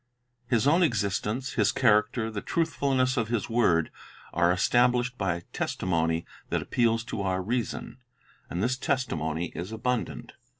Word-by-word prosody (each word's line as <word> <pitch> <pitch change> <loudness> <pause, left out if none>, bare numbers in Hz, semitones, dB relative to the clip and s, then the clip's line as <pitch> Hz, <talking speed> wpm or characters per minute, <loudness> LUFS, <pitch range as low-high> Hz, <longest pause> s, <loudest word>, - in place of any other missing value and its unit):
His 120 -1 +2
own 160 +6 +4
existence, 115 - 0
His - - +2
character, 110 -1 +2
the 105 -2 -4
truthfulness 135 -6 0
of 115 -3 +1
His 115 -1 -2
word, 85 -9 +3 0.4
are 85 +1 +3
established 125 +6 +2
by 90 -6 -2
testimony 80 -2 -1 0.2
that - - +1
appeals 115 -2 +1
to 115 -4 -4
our 95 -1 0
reason; 120 +3 -3 0.5
and 90 +3 -2
this 125 +2 +1
testimony 80 - -1
is 90 +5 -5
abundant. 120 +1 -2
115 Hz, 135 wpm, -27 LUFS, 95-125 Hz, 0.5 s, own